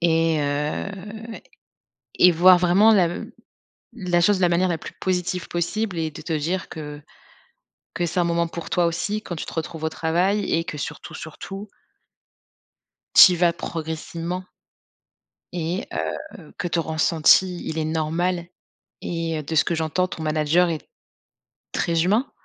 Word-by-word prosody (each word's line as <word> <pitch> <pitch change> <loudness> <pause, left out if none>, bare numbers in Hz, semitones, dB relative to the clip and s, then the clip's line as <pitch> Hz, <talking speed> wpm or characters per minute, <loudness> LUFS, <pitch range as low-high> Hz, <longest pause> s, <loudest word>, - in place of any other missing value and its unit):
et 165 -2 +2
heu 190 +9 -3 0.9
et 180 -1 +8
voir 180 +2 +7
vraiment 190 +5 +5
lav 175 -4 +2 0.7
la 180 -6 0
chose 200 +2 +4
de - - -4
la 175 - +4
manière 180 +2 +2
la 165 - 0
plus - - -9
positive 180 -1 -1
possible 180 +2 -2
et 160 -1 -1
de - - -10
te 165 - -4
dire 165 +5 -2
que 150 -2 -7 0.9
que 175 - 0
c'est 175 +2 -1
un - - +2
moment 170 0 +1
pour 170 -1 -7
toi 175 -1 +2
aussi, 205 +6 -1
quand 175 - -6
tu - - -4
te - - -8
retrouves 160 0 -5
au - - +2
travail 180 +6 0
et 165 0 +1
que 150 - -6
surtout, - - -6
surtout 195 +6 -8 1.5
Tu 180 - +10
y - - 0
vas 170 0 +3
progressivement 165 +2 -5 1.1
et 175 +4 -3
heu, - - -5
que 180 -3 -2
ton 165 -1 0
ressenti, 160 +3 +3
il 160 - -3
est 155 - 0
normal 165 +3 -1 0.6
et 165 -2 -2
heu, - - -6
de 160 +3 -4
ce - - +5
que 170 - -1
j'entends 160 +3 0
ton 160 - -7
manager 155 +3 +2
est 160 -2 -4 0.9
très 165 -1 +1
humain 215 +9 +1
170 Hz, 160 wpm, -23 LUFS, 160-185 Hz, 1.5 s, Tu